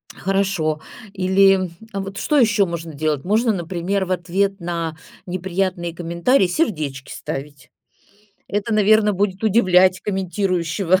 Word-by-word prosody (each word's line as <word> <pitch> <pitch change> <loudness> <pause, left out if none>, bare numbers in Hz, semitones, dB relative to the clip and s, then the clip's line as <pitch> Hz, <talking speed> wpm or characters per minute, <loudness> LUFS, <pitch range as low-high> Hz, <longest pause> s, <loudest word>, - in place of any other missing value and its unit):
Хорошо. 190 -5 0 0.3
Или 190 0 +3 0.2
вот 195 -1 -5
что 300 - +1
ещё 210 -6 +4
можно 170 -2 -6
делать? 150 -1 -1
Можно, 220 +4 +2
например, 180 +2 -2
в 185 - -6
ответ 190 +2 0
на 170 -2 -3 0.3
неприятные 180 -1 -2
комментарии 170 +7 +1
сердечки 155 - -2
ставить. 140 0 -7 0.8
Это, 205 +3 -2
наверно, 215 0 +4
будет 195 +1 -1
удивлять 185 -3 +4
комментирующего, 185 -2 0
185 Hz, 115 wpm, -21 LUFS, 170-200 Hz, 0.8 s, ещё